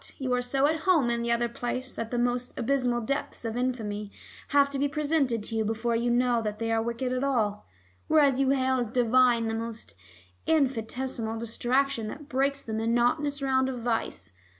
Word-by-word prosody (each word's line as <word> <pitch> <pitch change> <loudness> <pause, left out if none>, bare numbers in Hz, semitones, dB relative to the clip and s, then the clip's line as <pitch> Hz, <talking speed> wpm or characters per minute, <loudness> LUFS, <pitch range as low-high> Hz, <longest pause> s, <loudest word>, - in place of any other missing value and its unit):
You 260 -2 -1
are 250 - +2
so 270 +3 +1
at 315 +2 +1
home 295 -10 +4
in 235 0 0
the 235 0 -1
other 235 0 +2
place 245 +2 -3
that 230 -1 -4
the 245 - -2
most 245 +1 -1
abysmal 245 -1 +1
depths 275 0 -3
of 225 0 -3
infamy 215 -5 -2 0.4
have 280 0 +4
to 275 - -3
be 285 - +2
presented 280 -6 0
to 225 - -4
you 220 - +1
before 225 +2 -1
you 235 +1 0
know 240 -1 +2
they 220 +1 -3
are 225 0 +2
wicked 235 +2 -2
at 255 +1 -1
all, 220 -7 0 0.4
whereas 285 -4 +4
you 270 -1 +2
hail 260 -1 +2
as 240 -3 -2
divine 245 -1 +3
the 225 - -1
most 230 0 -5 0.5
infinitesimal 255 -5 0
distraction 240 +1 0
that 290 +6 -8
breaks 275 +1 0
the 220 - -6
monotonous 240 +6 +1
round 265 -1 +2
of 250 -2 -5
vice. 225 - -2
245 Hz, 190 wpm, -27 LUFS, 230-270 Hz, 0.5 s, home